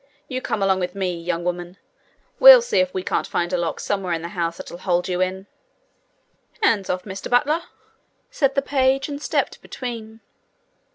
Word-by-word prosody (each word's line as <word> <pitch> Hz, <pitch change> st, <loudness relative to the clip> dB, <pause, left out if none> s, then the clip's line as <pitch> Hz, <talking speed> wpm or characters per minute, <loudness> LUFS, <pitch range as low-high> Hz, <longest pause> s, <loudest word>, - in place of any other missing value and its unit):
You 255 Hz, -1 st, -4 dB
come 205 Hz, -, -2 dB
along 190 Hz, -1 st, +2 dB
with 180 Hz, +1 st, -3 dB
me, 190 Hz, -2 st, -1 dB
young 170 Hz, 0 st, -3 dB
woman; 175 Hz, +1 st, -4 dB, 0.6 s
we'll -, -, +10 dB
see 480 Hz, -2 st, +1 dB
if 275 Hz, 0 st, +1 dB
we 185 Hz, -, -4 dB
can't -, -, -1 dB
find 175 Hz, +1 st, -2 dB
a -, -, +2 dB
lock 170 Hz, -2 st, -2 dB
somewhere 195 Hz, -4 st, -2 dB
in 165 Hz, 0 st, -3 dB
the 170 Hz, -, -5 dB
house 170 Hz, -1 st, -3 dB
that'll 175 Hz, -, -9 dB
hold 180 Hz, -1 st, 0 dB
you 180 Hz, -1 st, -1 dB
in!' 190 Hz, +1 st, -2 dB, 1.2 s
'Hands 210 Hz, -, +2 dB
off, 180 Hz, 0 st, -1 dB
Mr 195 Hz, -1 st, -7 dB
Butler!' 295 Hz, +7 st, +2 dB, 0.7 s
said 275 Hz, -2 st, +1 dB
the 275 Hz, -, +1 dB
page, 270 Hz, -1 st, +1 dB
and 285 Hz, 0 st, -6 dB
stepped -, -, -1 dB
between. 225 Hz, -3 st, -7 dB
195 Hz, 180 wpm, -22 LUFS, 180-265 Hz, 1.2 s, we'll